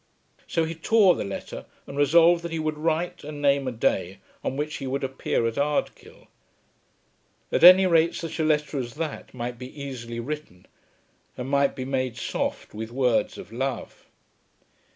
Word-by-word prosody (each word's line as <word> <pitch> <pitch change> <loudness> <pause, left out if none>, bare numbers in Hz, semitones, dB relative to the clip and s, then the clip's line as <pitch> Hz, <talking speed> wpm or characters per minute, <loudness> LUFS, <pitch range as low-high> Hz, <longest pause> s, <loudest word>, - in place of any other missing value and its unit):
So 165 - +1
he 160 +1 -3
tore 190 +3 +4
the - - -3
letter, 100 -1 -7 0.2
and 140 - -9
resolved 165 +4 +5
that 170 -1 -6
he 165 - -2
would 155 -1 -1
write 165 +2 -1
and 150 0 -7
name 140 -1 +2
a - - -1
day 95 -5 -1 0.3
on 135 - -2
which 150 +1 -3
he 135 - -5
would 135 +2 -2
appear 135 -3 -1
at 115 +3 -1
Ardkill. 145 +1 -2 1.3
At - - +1
any 185 +2 +10
rate 170 -2 +3
such 165 0 -5
a - - +2
letter 150 -2 +1
as 120 -1 -5
that 155 -1 -5
might 120 -1 -5
be 130 +3 -9
easily 120 -4 -6
written, 135 -8 -6 0.7
and 125 - -4
might 140 0 +2
be 130 - -4
made 130 -3 -2
soft - - -3
with 110 +1 -5
words 125 -2 +1
of - - -10
love. 130 +1 -4
140 Hz, 175 wpm, -25 LUFS, 125-160 Hz, 1.3 s, any